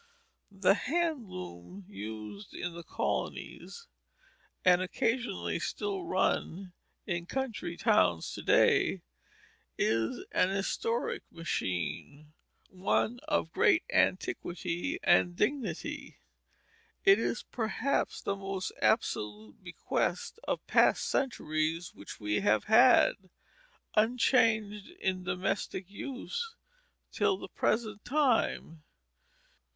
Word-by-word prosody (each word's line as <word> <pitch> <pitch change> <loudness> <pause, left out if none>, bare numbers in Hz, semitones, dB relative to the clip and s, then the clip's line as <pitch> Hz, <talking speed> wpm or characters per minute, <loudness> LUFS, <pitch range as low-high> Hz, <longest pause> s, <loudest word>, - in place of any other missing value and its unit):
The 195 -1 +4
hand 295 - -1
loom 90 - -9
used 105 - -8
in 175 -1 -4
the 170 - -7
colonies, 465 - -4 0.8
and 180 0 +6
occasionally 235 +6 -1
still 395 -3 -3
run 190 - -1 0.3
in 175 -3 -3
country 220 -10 -3
towns 85 -3 +2
to - - -6
day, - - +3 0.7
is 115 0 0
an 180 - +3
historic 200 +4 -1
machine, 145 - -4 0.4
one 195 +5 0
of 295 - 0
great 320 - +4
antiquity 180 - 0
and 175 0 +4
dignity. 265 +7 -2 0.9
It 390 0 +7
is, - - -1
perhaps, 245 +4 -1
the 200 - -1
most 195 -1 -4
absolute 105 - 0
bequest 175 - -2
of - - -2
past - - +4
centuries 165 - -1
which 100 - -10
we 105 -1 0
have 110 +1 +2
had, 220 -4 +5 0.6
unchanged, 220 -2 +2
in 185 -1 -1
domestic 185 +1 -2
use 365 - -5 0.6
till 390 - +1
the - - -9
present 215 -3 -1
time. 250 - +1
195 Hz, 95 wpm, -31 LUFS, 165-245 Hz, 0.9 s, It